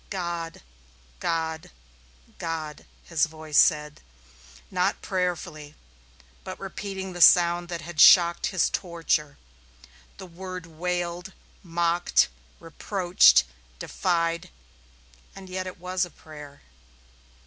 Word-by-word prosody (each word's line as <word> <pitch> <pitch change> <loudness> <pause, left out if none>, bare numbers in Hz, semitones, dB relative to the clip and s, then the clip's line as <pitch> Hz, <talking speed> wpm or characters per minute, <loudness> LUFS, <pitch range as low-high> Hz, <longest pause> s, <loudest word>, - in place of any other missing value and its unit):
"God, 170 -3 -5 0.6
God, 160 -1 -2 0.7
God!" 160 -2 -5 0.2
his 165 -1 +1
voice 155 -1 0
said, 150 -2 +2 0.7
not 180 0 0
prayerfully, 175 -5 -3 0.7
but - - -8
repeating 190 -2 -6
the 175 - -6
sound 175 0 +6
that 170 -1 -5
had 165 -2 -2
shocked 170 -2 +7
his 185 -4 0
torture. 165 -5 -2 0.8
The 190 - -9
word 185 0 -8
wailed, 175 +2 -4 0.3
mocked, 170 -1 +1 0.3
reproached, 165 - +3 0.3
defied 170 - -1 0.9
and 195 -1 -11
yet 185 0 -4
it 185 - -8
was 180 +1 -1
a 175 - -4
prayer. 150 -3 -13
170 Hz, 100 wpm, -25 LUFS, 160-180 Hz, 0.9 s, shocked